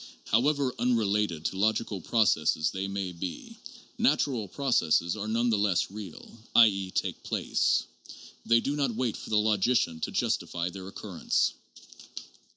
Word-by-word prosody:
However 135 +3 +2
unrelated 105 -8 0
to 95 - -2
logical 105 -2 0
processes 80 -8 +2
they 95 +1 -3
may 100 -2 -3
be, 90 - -7 0.4
natural 135 - +1
processes 90 - +1
are 105 0 -5
none 115 +2 +1
the 105 - +2
less 100 -3 +1
real, 105 +2 -10 0.2
i.e., 100 -5 +5
take - - -3
place; - - +1 0.6
they 115 0 +3
do 140 +4 -2
not 140 -6 0
wait 120 -2 -1
for - - -9
the 110 - +2
logician 105 -4 +2
to - - -2
justify 85 0 -1
their 95 0 -8
occurrence. 95 - -1
105 Hz, 140 wpm, -28 LUFS, 95-120 Hz, 0.6 s, i.e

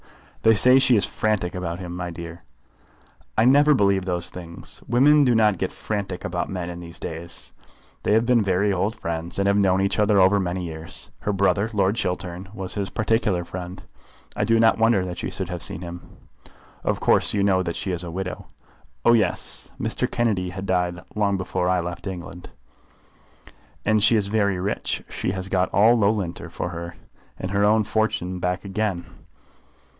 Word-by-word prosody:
"They 110 0 +5
say 125 +5 +6
she 130 -2 +4
is 105 - +3
frantic 105 -5 -1
about 85 -2 -4
him, 90 -1 -7
my 90 0 -4
dear." 85 0 -8 0.9
"I 110 - +4
never 145 +3 +6
believe 100 -4 +2
those 90 -2 -2
things. 85 -2 -7
Women 145 +5 +5
do 125 -3 +3
not 105 -5 +3
get - - -1
frantic 100 -4 -4
about 90 -1 -2
men 90 -2 -4
in 85 - -8
these 85 -1 -9
days. 85 +1 -6 0.5
They - - +1
have 110 +2 +3
been 120 -1 +4
very 100 +1 +1
old 100 +5 -1
friends, 85 -3 -4
and 100 0 +1
have 100 - +3
known 95 -2 +3
each 100 +2 0
other 105 0 +3
for 100 +1 +2
many 90 -1 -2
years. 80 -1 -4
Her 105 - -2
brother, 100 +2 +1
Lord 100 0 +2
Chiltern, 90 -3 -3
was 95 -2 -4
his 100 -2 -2
particular 105 -5 0
friend. 90 +1 -7 0.5
I - - 0
do 115 0 +3
not 115 0 +4
wonder 110 -4 +3
that 90 -1 -6
she - - -3
should 95 -3 -3
have 90 -2 -5
seen 80 - 0
him." 85 0 -10 0.7
"Of - - 0
course - - +3
you 100 - +2
know 95 -2 +3
that 85 -2 -3
she 95 - -3
is 90 -1 -2
a 85 - -6
widow." 90 +2 -5 0.6
"Oh, 120 - +7
yes; 105 -6 0
Mr. - - -2
Kennedy 105 -6 0
had 95 +2 -6
died 90 -2 0
long 100 -2 +1
before 90 -1 -1
I 90 0 +2
left 85 +3 -6
England." 90 -1 -7 1.4
"And 110 0 +3
she 115 - +6
is 105 - +1
very 100 -2 +1
rich. 100 +3 -2
She - - -3
has 95 -1 -4
got 95 -1 +1
all 110 +5 +5
Loughlinter 100 -5 0
for - - -4
her 85 -1 -5
life, 85 - -11 0.4
and 95 - -5
her 100 0 +2
own 110 +1 +4
fortune 110 -4 -1
back 90 +2 -2
again. 95 -3 -2
95 Hz, 190 wpm, -23 LUFS, 90-105 Hz, 1.4 s, Oh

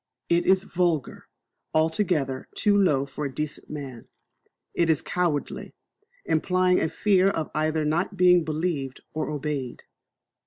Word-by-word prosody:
It 170 0 +2
is 190 0 +4
vulgar, 170 -6 -1 0.5
altogether 155 -5 0
too 205 -1 +3
low 155 -9 +3
for 140 +2 -5
a 140 - -3
decent 150 +2 -5
man. 135 -6 -7 0.7
It 170 -1 +1
is 160 - +4
cowardly, 175 -5 -2 0.5
implying 180 +3 +2
a 160 - 0
fear 195 0 +3 0.2
either 155 +1 0
of - - 0
not 175 +5 -1
being 180 -1 +5
believed 155 -4 -3
or 155 - -2
obeyed. 145 -4 -4
160 Hz, 130 wpm, -25 LUFS, 145-180 Hz, 0.7 s, being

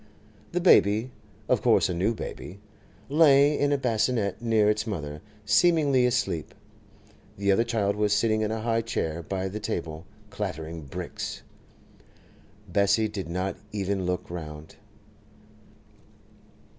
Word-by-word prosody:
The 180 - 0
baby—of 115 - +2
course - - +4
a - - -2
new 95 +7 0
baby—lay 140 - +1
in 145 0 +2
a 145 - +3
bassinette 115 -5 0
near 110 -3 +2
its 105 +2 +1
mother, 75 -7 -5 0.2
seemingly 140 - +4
asleep; 120 -10 -2 0.8
the 100 0 +1
other 100 +4 +3
child 110 -4 0
was 105 0 +1
sitting 110 +1 +2
in 105 - 0
a 110 0 -3
high 115 0 +1
chair 85 -7 -3
by 95 +2 -3
the 100 +3 -5
table, 80 -5 -5 0.2
clattering 85 -6 -5
'bricks.' - - -6 1.2
Bessie 100 +4 +2
did 95 -5 -6
not 90 +2 -2
even 100 -2 -2
look 90 0 -2
round. 75 -2 -8
105 Hz, 120 wpm, -26 LUFS, 90-115 Hz, 1.2 s, course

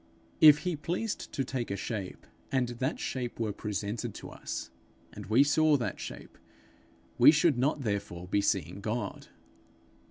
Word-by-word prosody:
If 150 -1 +8
he 180 -2 0
pleased 180 +8 -3
to 135 - -1
take 125 -2 -3
a 100 - -2
shape, 100 -1 -5 0.3
and 130 -2 +1
that 130 +4 -2
shape 125 -3 -4
were 110 -3 -1
presented 105 +2 -4
to - - -9
us, - - -6 0.4
and 105 -2 -9
we 115 +6 +5
saw 150 +1 +4
that 115 -7 -3
shape, - - -9 0.8
we - - +9
should 150 -3 +4
not 140 +3 +1
therefore 100 -6 -3
be 100 +2 +1
seeing 100 0 -1
God. 110 -1 -4
120 Hz, 155 wpm, -30 LUFS, 105-145 Hz, 0.8 s, we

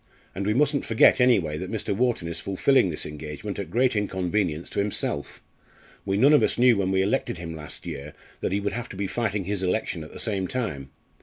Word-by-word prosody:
And 100 +2 -3
we 105 - +2
mustn't 145 +1 +2
forget 115 +3 +5
anyway 90 -12 +3
that - - -5
Mr. 100 - -2
Wharton 120 -6 0
is 85 0 -5
fulfilling 100 +4 +2
this 80 - -3
engagement 75 0 -6
at - - -4
great 120 +5 +2
inconvenience 95 -4 -1
to - - -2
himself. 100 -7 -2 0.6
We 95 0 +1
none 140 +8 +6
of 150 - +6
us - - +1
knew 125 -1 +6
when 95 -1 0
we 95 0 +2
elected 95 -2 0
him 85 -1 -6
last 75 -2 -9
year 70 +2 -6 0.3
that - - -2
he 100 - +1
would 100 0 -2
have 120 +1 -5
to - - -8
be 100 +1 -2
fighting 105 -1 -1
his 100 +1 -3
election 90 -3 -1
at 75 - -11
the - - -10
same 100 -4 -1
time. 90 - -3
100 Hz, 220 wpm, -25 LUFS, 85-115 Hz, 0.6 s, none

